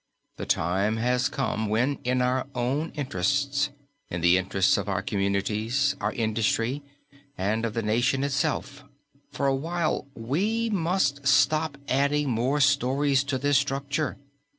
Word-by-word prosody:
The - - -6
time 95 +6 +1
has 125 +4 +1
come 130 -6 -2
when 125 +6 +1
in 125 0 +1
our 125 +1 0
own 135 +7 -1
interests, 140 - 0 0.4
in 85 - -4
the 85 +1 +5
interests 95 +1 +2
of 100 0 -2
our 100 - -1
communities, 105 +7 0
our - - 0
industry, 115 +3 0 0.6
and 105 +4 0
of 115 -1 -4
the 115 - -1
nation 120 +5 +1
itself, 145 0 -2 0.5
for 140 - -2
a 135 - +3
while 160 +1 -1
we 205 - -1
must 165 -7 0
stop 155 +1 +3
adding 140 +1 +1
more 125 +6 0
stories 135 +1 +2
to 135 -1 -1
this 145 +1 +3
structure. 140 +2 -2
135 Hz, 140 wpm, -26 LUFS, 110-145 Hz, 0.6 s, the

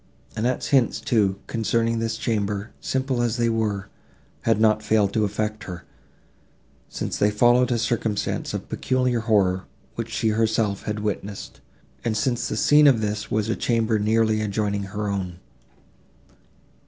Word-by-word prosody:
Annette's 120 +3 -1
hints, 130 -5 +3
too, 100 -5 +1
concerning 115 0 0
this 115 0 -2
chamber, 105 -2 -2
simple 130 -2 -1
as 120 0 0
they 120 -1 +2
were, 105 -3 -1 0.5
had - - +2
not 110 -1 +3
failed 105 -2 +2
to 110 -1 +2
affect 105 +1 -3
her, 90 -2 -7 1.1
since - - -4
they 105 - +4
followed 120 +4 +4
a 120 - +2
circumstance 115 -2 -1
of - - -5
peculiar 125 -2 0
horror, 100 -5 +2 0.3
which - - -5
she 110 - 0
herself 110 -2 0
had 105 0 -3
witnessed, 105 -1 -5 0.4
and 110 -2 0
since 120 +1 0
the 110 - -3
scene 150 +5 +6
of 125 -6 +4
this 105 0 -2
was 110 0 0
a 115 - 0
chamber 115 -2 +1
nearly 110 +1 +2
adjoining 100 -1 -1
her 105 +2 -4
own. 95 -3 -3
110 Hz, 150 wpm, -24 LUFS, 105-115 Hz, 1.1 s, scene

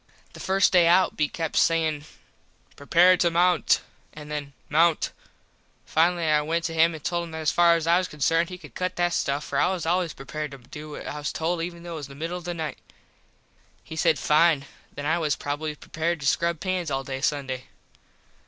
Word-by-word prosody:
The - - -11
first 195 +1 +2
day 175 -2 +6
out 180 +2 +4
be 150 - +1
kept 160 -2 -4
sayin 160 -3 +2 0.7
"Prepare 175 +5 +4
to 175 - +3
mount" 170 -1 +3 0.3
and 150 0 -10
then 145 -2 -5
"Mount." 165 +2 +2 0.7
Finally 170 +1 +2
I 150 -1 +3
went 165 +3 -1
up - - 0
to - - -6
him 165 +1 +3
and 155 - -10
told 170 -1 -1
him 165 - -11
that - - -5
as 155 - +2
far 170 -1 +5
as 165 -1 -2
I 170 +2 +4
was 185 - -2
concerned 165 +3 +1
he 180 - -7
could - - -14
cut 185 0 -3
that 175 0 +1
stuff 140 -2 -1
for - - -2
I - - +4
was 180 -4 -3
always 175 -1 0
prepared 150 +3 -6
to 140 - -10
do 150 +5 -10
what 150 - -8
I 150 - -5
was 145 - -3
told 165 +1 -1
even 170 0 -6
though 175 - -8
it 160 - -5
was 140 - -7
the 140 - -12
middle 165 +5 -4
of 175 - -14
the 175 -1 -3
night. 160 -2 -5 1.0
He 160 - -9
said, 160 -1 +2
Fine, 150 -2 +3 0.3
then 145 - -7
I 160 +3 +1
was 150 -3 0
probably 150 +1 -4
prepared 165 +3 -3
to - - -5
scrub 170 +3 +1
pans 185 -2 -2
all 135 -1 -2
day 135 0 -5
Sunday. 135 -3 -2
165 Hz, 220 wpm, -25 LUFS, 150-170 Hz, 1.0 s, day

